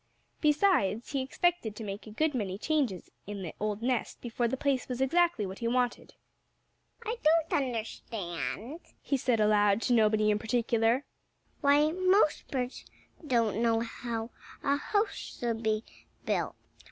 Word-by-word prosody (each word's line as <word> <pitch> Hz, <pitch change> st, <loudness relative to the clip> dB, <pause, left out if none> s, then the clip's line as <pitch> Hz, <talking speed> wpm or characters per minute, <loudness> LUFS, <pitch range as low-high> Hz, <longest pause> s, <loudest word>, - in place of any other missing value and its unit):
Besides, 295 Hz, -, +2 dB
he 275 Hz, -2 st, 0 dB
expected 265 Hz, -4 st, 0 dB
to 225 Hz, -, -7 dB
make 200 Hz, +1 st, -6 dB
a -, -, -7 dB
good 310 Hz, +8 st, 0 dB
many 200 Hz, -6 st, -2 dB
changes 255 Hz, -, -1 dB, 0.2 s
in 205 Hz, -2 st, -5 dB
the 165 Hz, -, -6 dB
old 210 Hz, +1 st, -2 dB
nest 250 Hz, -1 st, -1 dB
before 240 Hz, 0 st, -1 dB
the 265 Hz, -, -2 dB
place 270 Hz, -2 st, 0 dB
was 250 Hz, -1 st, -3 dB
exactly 335 Hz, -2 st, +2 dB
what 190 Hz, 0 st, -7 dB
he 230 Hz, -, -1 dB
wanted. 245 Hz, 0 st, -1 dB, 0.9 s
"I 455 Hz, +2 st, -2 dB
don't 320 Hz, +1 st, +3 dB
understand," 220 Hz, -, -4 dB, 0.2 s
he 280 Hz, -, -1 dB
said 250 Hz, -3 st, +1 dB
aloud 210 Hz, -1 st, +4 dB
to 250 Hz, -, +2 dB
nobody 215 Hz, -2 st, +4 dB
in 210 Hz, -, +1 dB
particular, 230 Hz, +2 st, +1 dB, 0.5 s
"why 290 Hz, +2 st, +4 dB
most 370 Hz, -1 st, +3 dB
birds 250 Hz, -2 st, -3 dB, 0.4 s
don't 230 Hz, -5 st, +2 dB
know 230 Hz, -1 st, +3 dB
how 230 Hz, 0 st, -4 dB, 0.3 s
a 280 Hz, -, +3 dB
house 410 Hz, +7 st, 0 dB, 0.3 s
should 230 Hz, -2 st, -1 dB
be 215 Hz, -1 st, 0 dB, 0.4 s
built. -, -, -1 dB
235 Hz, 150 wpm, -30 LUFS, 215-280 Hz, 0.9 s, aloud